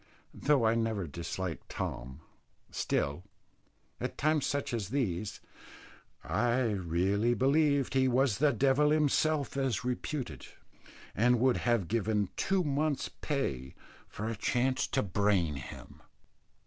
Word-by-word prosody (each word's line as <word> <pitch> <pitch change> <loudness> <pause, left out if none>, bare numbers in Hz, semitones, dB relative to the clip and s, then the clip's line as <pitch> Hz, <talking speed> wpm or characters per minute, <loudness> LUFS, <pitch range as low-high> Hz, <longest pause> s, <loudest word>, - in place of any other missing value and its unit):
Though 140 -5 +2
I 110 - +4
never 115 -4 -1
disliked 85 +3 -5
Tom, 65 +4 -5 0.5
still, 70 +4 -1 0.8
at - - -4
times 155 0 +2
such 140 -3 -2
as 105 -5 -2
these, 105 -7 -2 0.8
I 120 +9 +1
really 100 +5 +1
believed 140 +2 +2
he 130 0 +3
was 130 -2 +2
the 150 0 +4
devil 135 +4 +3
himself 155 -1 +2
as 135 -5 0
reputed, 125 - -4 0.7
and 120 +3 +3
would 130 +1 +3
have 120 -7 +1
given 105 -2 0
two 190 -1 +1
months' 145 0 0
pay 65 - -2 0.3
for 105 - -5
a 115 - -2
chance 130 +5 0
to - - 0
brain 95 -6 +1
him. 65 - -10
120 Hz, 120 wpm, -31 LUFS, 95-140 Hz, 0.8 s, I